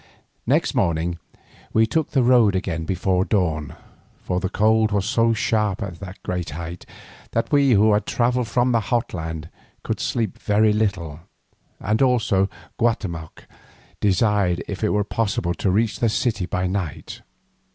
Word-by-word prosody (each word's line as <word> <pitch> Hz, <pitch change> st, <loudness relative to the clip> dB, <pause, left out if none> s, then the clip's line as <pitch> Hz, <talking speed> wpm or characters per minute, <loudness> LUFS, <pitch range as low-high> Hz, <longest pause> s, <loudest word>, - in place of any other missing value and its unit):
Next -, -, +2 dB
morning 85 Hz, +1 st, 0 dB, 0.5 s
we 110 Hz, 0 st, +4 dB
took 155 Hz, +7 st, -1 dB
the 135 Hz, -3 st, +2 dB
road 120 Hz, -5 st, +5 dB
again 85 Hz, -4 st, -2 dB
before 95 Hz, +1 st, +1 dB
dawn, 80 Hz, -, -1 dB, 0.5 s
for 90 Hz, -, -1 dB
the 95 Hz, 0 st, -2 dB
cold 110 Hz, +1 st, +2 dB
was 100 Hz, -2 st, 0 dB
so 115 Hz, +1 st, +2 dB
sharp 105 Hz, -2 st, 0 dB
at 95 Hz, -4 st, -7 dB
this 95 Hz, -1 st, -8 dB
great 90 Hz, -3 st, -3 dB
height 85 Hz, +1 st, -7 dB, 0.5 s
that 115 Hz, -, -1 dB
we, 140 Hz, -3 st, +4 dB
who 105 Hz, +1 st, +5 dB
had 105 Hz, -, 0 dB
travelled 125 Hz, 0 st, +1 dB
from 125 Hz, +2 st, +1 dB
the 115 Hz, -, +3 dB
hot 115 Hz, +2 st, -1 dB
land, 80 Hz, -2 st, -5 dB, 0.3 s
could -, -, -3 dB
sleep 115 Hz, -5 st, -2 dB
very 105 Hz, 0 st, +3 dB
little, 95 Hz, -8 st, -1 dB, 0.6 s
and 105 Hz, +4 st, 0 dB
also 115 Hz, -7 st, +2 dB, 0.3 s
Guatemoc 95 Hz, -9 st, -2 dB, 0.5 s
desired 100 Hz, -3 st, +2 dB
if 100 Hz, +1 st, -5 dB
it 105 Hz, -, +2 dB
were 105 Hz, 0 st, +1 dB
possible 100 Hz, -5 st, -1 dB
to 95 Hz, -, -1 dB
reach 105 Hz, +1 st, +1 dB
the 115 Hz, -, +2 dB
city 105 Hz, -2 st, -1 dB
that 95 Hz, -2 st, -1 dB
night. 95 Hz, -7 st, -4 dB
100 Hz, 155 wpm, -22 LUFS, 90-115 Hz, 0.6 s, road